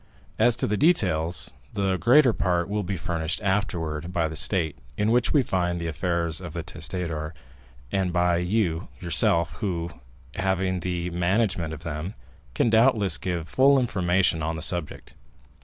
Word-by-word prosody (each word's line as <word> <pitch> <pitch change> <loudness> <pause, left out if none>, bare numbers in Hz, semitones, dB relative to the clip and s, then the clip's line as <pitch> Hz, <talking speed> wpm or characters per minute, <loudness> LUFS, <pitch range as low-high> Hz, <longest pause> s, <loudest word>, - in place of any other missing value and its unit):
As 115 +1 +4
to - - -1
the 105 - 0
details, 90 - +2 0.2
the 95 -2 +1
greater 125 +3 +5
part 90 -4 0
will 105 +1 -2
be 95 0 -3
furnished 85 -2 -2
afterwards 85 -6 -1
by 85 -2 -1
the 80 - -7
state 80 -1 +1 0.2
in 105 +2 +1
which 120 +1 +2
we 145 -4 +3
find 90 -5 -1
the 85 - -4
affairs 85 0 -1
of 85 -4 -8
the 85 -1 -4
testator, 85 -2 -4 0.6
and 95 -2 0
by 90 -1 +2
yourself, 85 -3 +1
who, 85 -5 -3 0.4
having 95 -1 0
had - - -5
the 90 -1 -3
management 90 -1 0
of 80 0 -8
them, 80 +4 -5 0.4
can 115 - +2
doubtless 110 -3 +4
give 85 -3 -3
full 135 +5 +4
information 90 -7 +1
on 80 +2 -2
the 80 - -4
subject. 85 -4 -2
90 Hz, 155 wpm, -25 LUFS, 85-100 Hz, 0.6 s, greater